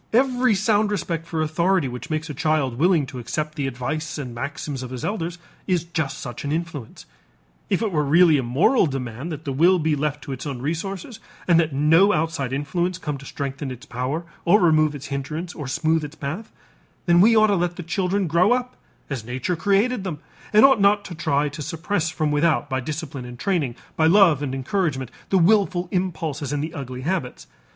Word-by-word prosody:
Every 250 Hz, -2 st, +3 dB
sound 210 Hz, +1 st, +2 dB
respect 170 Hz, -5 st, -3 dB
for 160 Hz, -2 st, -1 dB
authority 170 Hz, +1 st, +1 dB
which 125 Hz, +6 st, -7 dB
makes 155 Hz, 0 st, -2 dB
a 150 Hz, -, -5 dB
child 145 Hz, -4 st, 0 dB
willing 170 Hz, -3 st, +3 dB
to 130 Hz, -1 st, -8 dB
accept 150 Hz, +6 st, -3 dB
the 145 Hz, -3 st, -2 dB
advice 135 Hz, +4 st, -4 dB
and 130 Hz, -5 st, -5 dB
maxims 140 Hz, +2 st, -5 dB
of 130 Hz, -, -6 dB
his 125 Hz, -1 st, -5 dB
elders 175 Hz, -4 st, -3 dB, 0.3 s
is 180 Hz, -3 st, +1 dB
just 160 Hz, -5 st, -3 dB
such 120 Hz, -2 st, -7 dB
an 145 Hz, -, -2 dB
influence. 160 Hz, -6 st, -5 dB, 0.6 s
If -, -, +1 dB
it 215 Hz, -, 0 dB
were 150 Hz, -3 st, +1 dB
really 160 Hz, +1 st, +5 dB
a -, -, +1 dB
moral 145 Hz, -, +3 dB
demand 130 Hz, +2 st, -5 dB
that 155 Hz, 0 st, -7 dB
the 140 Hz, -, -2 dB
will 175 Hz, +7 st, +5 dB
be 160 Hz, -2 st, +1 dB
left 145 Hz, 0 st, -2 dB
to -, -, -7 dB
its 135 Hz, +3 st, -5 dB
own 135 Hz, -3 st, -4 dB
resources 185 Hz, -, -4 dB, 0.3 s
and 170 Hz, -2 st, +5 dB
that 160 Hz, -2 st, +1 dB
no 160 Hz, +9 st, +4 dB
outside 155 Hz, -5 st, -1 dB
influence 170 Hz, +6 st, -1 dB
come 150 Hz, -5 st, -4 dB
to 140 Hz, -, -11 dB
strengthen 140 Hz, 0 st, -4 dB
its 130 Hz, +2 st, -8 dB
power 140 Hz, +5 st, -3 dB, 0.2 s
or 205 Hz, +5 st, +5 dB
remove 155 Hz, -4 st, +3 dB
its 140 Hz, 0 st, -8 dB
hindrances 155 Hz, +6 st, -4 dB
or 145 Hz, -4 st, -6 dB
smooth 160 Hz, +3 st, +1 dB
its 150 Hz, +1 st, -7 dB
path, 160 Hz, +11 st, -5 dB, 0.5 s
then 175 Hz, 0 st, +5 dB
we 225 Hz, +3 st, +6 dB
ought 215 Hz, 0 st, +6 dB
to -, -, +3 dB
let 175 Hz, -1 st, 0 dB
the 175 Hz, -, -6 dB
children 185 Hz, +3 st, 0 dB
grow 175 Hz, +7 st, +3 dB
up 250 Hz, 0 st, -2 dB, 0.3 s
as 135 Hz, -6 st, -4 dB
nature 130 Hz, +9 st, -2 dB
created 200 Hz, +6 st, +1 dB
them 180 Hz, -6 st, -4 dB, 0.3 s
and 215 Hz, +4 st, +7 dB
ought 265 Hz, -6 st, +5 dB
not 200 Hz, 0 st, +4 dB
to 180 Hz, -, -7 dB
try 150 Hz, -3 st, 0 dB
to 145 Hz, +2 st, -8 dB
suppress 165 Hz, +3 st, -2 dB
from 155 Hz, -2 st, -1 dB
without 150 Hz, 0 st, +2 dB
by 130 Hz, -, 0 dB
discipline 145 Hz, 0 st, -5 dB
and 125 Hz, 0 st, -9 dB
training, 155 Hz, -8 st, -1 dB, 0.2 s
by 160 Hz, -, +3 dB
love 170 Hz, -5 st, +5 dB
and 135 Hz, -2 st, -2 dB
encouragement, 135 Hz, -, -1 dB, 0.2 s
the 195 Hz, -, +3 dB
willful 185 Hz, -1 st, +3 dB
impulses 160 Hz, -6 st, -2 dB
and 145 Hz, 0 st, -1 dB
the 160 Hz, +1 st, -5 dB
ugly 130 Hz, -5 st, -6 dB
habits. 150 Hz, -4 st, -3 dB
155 Hz, 205 wpm, -23 LUFS, 140-180 Hz, 0.6 s, and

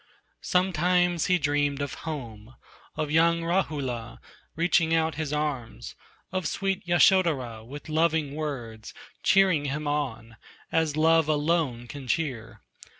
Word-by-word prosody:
Sometimes 180 Hz, -1 st, +1 dB
he 180 Hz, -, +4 dB
dreamed 145 Hz, -2 st, 0 dB
of 140 Hz, -2 st, -3 dB, 0.2 s
home, 120 Hz, -5 st, -7 dB, 0.4 s
Of 150 Hz, -1 st, -2 dB
young 165 Hz, +1 st, +3 dB
Rahula, 140 Hz, -10 st, -2 dB, 0.4 s
reaching 165 Hz, -1 st, +2 dB
out 160 Hz, 0 st, +1 dB
his 155 Hz, -1 st, -4 dB
arms, 140 Hz, -, -3 dB, 0.4 s
Of 185 Hz, -3 st, -2 dB
sweet 195 Hz, +5 st, -2 dB
Yasodhara 160 Hz, -, +3 dB
with 140 Hz, +5 st, -10 dB
loving 160 Hz, -2 st, +1 dB
words 120 Hz, -8 st, -6 dB, 0.3 s
Cheering 185 Hz, -6 st, +3 dB
him 150 Hz, +2 st, -3 dB
on, 125 Hz, -6 st, -3 dB, 0.3 s
as 160 Hz, -2 st, +1 dB
love 160 Hz, 0 st, +4 dB
alone 150 Hz, -5 st, 0 dB
can 130 Hz, +2 st, -9 dB
cheer. 120 Hz, -, -3 dB
150 Hz, 120 wpm, -26 LUFS, 130-165 Hz, 0.4 s, he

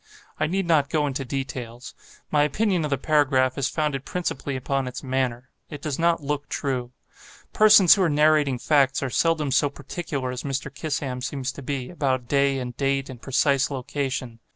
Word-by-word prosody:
I 155 Hz, -, +1 dB
need 190 Hz, +3 st, -1 dB
not 155 Hz, -4 st, +2 dB
go 150 Hz, -1 st, +1 dB
into 140 Hz, -1 st, -2 dB
details. 125 Hz, -2 st, -6 dB, 0.4 s
My 150 Hz, -, +3 dB
opinion 180 Hz, +4 st, +1 dB
of 150 Hz, -, -2 dB
the 140 Hz, -, 0 dB
paragraph 130 Hz, -3 st, +2 dB
is 135 Hz, -1 st, 0 dB
founded 150 Hz, -4 st, -1 dB
principally 155 Hz, -4 st, -3 dB
upon 135 Hz, +1 st, -2 dB
its 125 Hz, +3 st, -6 dB
manner. 130 Hz, -1 st, -2 dB, 0.2 s
It 145 Hz, -, -7 dB
does 145 Hz, 0 st, -4 dB
not 170 Hz, -2 st, +2 dB
look 145 Hz, 0 st, -3 dB
true. 125 Hz, -3 st, -2 dB, 0.6 s
Persons 210 Hz, -4 st, +7 dB
who 200 Hz, -, +1 dB
are 175 Hz, -, +3 dB
narrating 150 Hz, -3 st, +3 dB
facts, 135 Hz, 0 st, +2 dB
are 130 Hz, -, -2 dB
seldom 160 Hz, -2 st, +1 dB
so 140 Hz, +2 st, +3 dB
particular 140 Hz, -3 st, -5 dB
as 125 Hz, -1 st, -5 dB
Mr. 135 Hz, -1 st, -4 dB
Kissam 140 Hz, -3 st, -3 dB
seems 135 Hz, 0 st, -3 dB
to 140 Hz, -, -10 dB
be, 130 Hz, -2 st, -4 dB
about 130 Hz, -7 st, -1 dB
day 140 Hz, 0 st, +2 dB
and 125 Hz, -2 st, -5 dB
date 135 Hz, 0 st, -1 dB
and 120 Hz, -2 st, -11 dB
precise 135 Hz, +1 st, +2 dB
location. 130 Hz, -3 st, -4 dB
140 Hz, 180 wpm, -24 LUFS, 130-150 Hz, 0.6 s, Persons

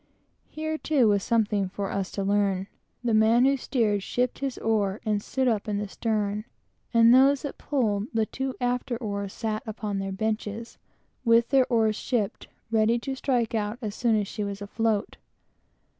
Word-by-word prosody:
Here, 315 Hz, 0 st, -3 dB
too, 275 Hz, -7 st, +3 dB
was 200 Hz, -1 st, +3 dB
something 210 Hz, -4 st, +1 dB
for 200 Hz, 0 st, -4 dB
us 195 Hz, -1 st, -2 dB
to 200 Hz, -, -2 dB
learn. 195 Hz, -1 st, +1 dB, 0.4 s
The 235 Hz, -2 st, +1 dB
man 225 Hz, +3 st, +5 dB
who 275 Hz, +1 st, +4 dB
steered, 225 Hz, -6 st, 0 dB
shipped 250 Hz, +5 st, -1 dB
his 275 Hz, -2 st, -3 dB
oar 210 Hz, -3 st, 0 dB
and 210 Hz, -1 st, +1 dB
stood 260 Hz, +4 st, -1 dB
up 225 Hz, -2 st, 0 dB
in 205 Hz, -1 st, -1 dB
the 205 Hz, 0 st, -3 dB
stern, 210 Hz, 0 st, -2 dB, 0.5 s
and 230 Hz, 0 st, +6 dB
those 270 Hz, +2 st, +5 dB
that 285 Hz, -, -6 dB
pulled 220 Hz, -7 st, 0 dB
the 225 Hz, -2 st, 0 dB, 0.3 s
after 245 Hz, -1 st, -1 dB
oars 200 Hz, -4 st, -4 dB
sat 215 Hz, -1 st, -3 dB
upon 210 Hz, -2 st, -3 dB
their 195 Hz, 0 st, -3 dB
benches, 215 Hz, +2 st, -3 dB, 0.4 s
with 230 Hz, -1 st, +4 dB
their 265 Hz, -2 st, +4 dB
oars 220 Hz, -2 st, +2 dB
shipped, 225 Hz, -6 st, -2 dB, 0.2 s
ready 225 Hz, +1 st, +3 dB
to 265 Hz, +3 st, -4 dB
strike 250 Hz, -4 st, 0 dB
out 215 Hz, 0 st, -1 dB
as 215 Hz, -5 st, -4 dB
soon 230 Hz, 0 st, +1 dB
as 205 Hz, -, -2 dB
she 210 Hz, -, -4 dB
was 200 Hz, -1 st, -4 dB
afloat. 210 Hz, +1 st, -1 dB
220 Hz, 175 wpm, -26 LUFS, 205-240 Hz, 0.5 s, and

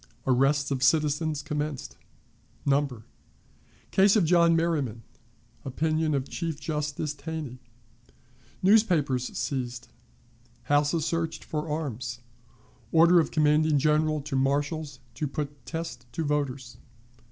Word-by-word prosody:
Arrests 135 Hz, +3 st, +2 dB
of 130 Hz, -2 st, -1 dB
Citizens 150 Hz, +1 st, +2 dB
commenced. 150 Hz, -3 st, -4 dB, 0.7 s
Number. 135 Hz, -5 st, 0 dB, 0.9 s
Case 195 Hz, +2 st, +5 dB
of 205 Hz, -6 st, +4 dB
John 170 Hz, 0 st, +4 dB
Merryman. 145 Hz, -9 st, -1 dB, 0.6 s
Opinion 155 Hz, +3 st, 0 dB
of 135 Hz, 0 st, -2 dB
Chief 165 Hz, -4 st, -4 dB
Justice 150 Hz, -1 st, -3 dB
Taney. 145 Hz, -3 st, -6 dB, 1.0 s
Newspapers 175 Hz, -, +3 dB
seized. 125 Hz, -3 st, -3 dB, 0.7 s
Houses 145 Hz, +2 st, +2 dB
searched 165 Hz, -1 st, -2 dB
for 155 Hz, 0 st, -4 dB
Arms. 125 Hz, -5 st, -4 dB, 0.7 s
Order 170 Hz, +2 st, +6 dB
of 160 Hz, -, +1 dB
Commanding 155 Hz, 0 st, +3 dB
General 155 Hz, +1 st, +2 dB
to 140 Hz, -1 st, -5 dB
Marshals 140 Hz, +2 st, 0 dB, 0.2 s
to 150 Hz, -, -3 dB
put 145 Hz, 0 st, -6 dB
Test 165 Hz, -7 st, -5 dB
to 165 Hz, -, -2 dB
Voters. 140 Hz, -4 st, -2 dB
150 Hz, 105 wpm, -27 LUFS, 135-160 Hz, 1.0 s, Order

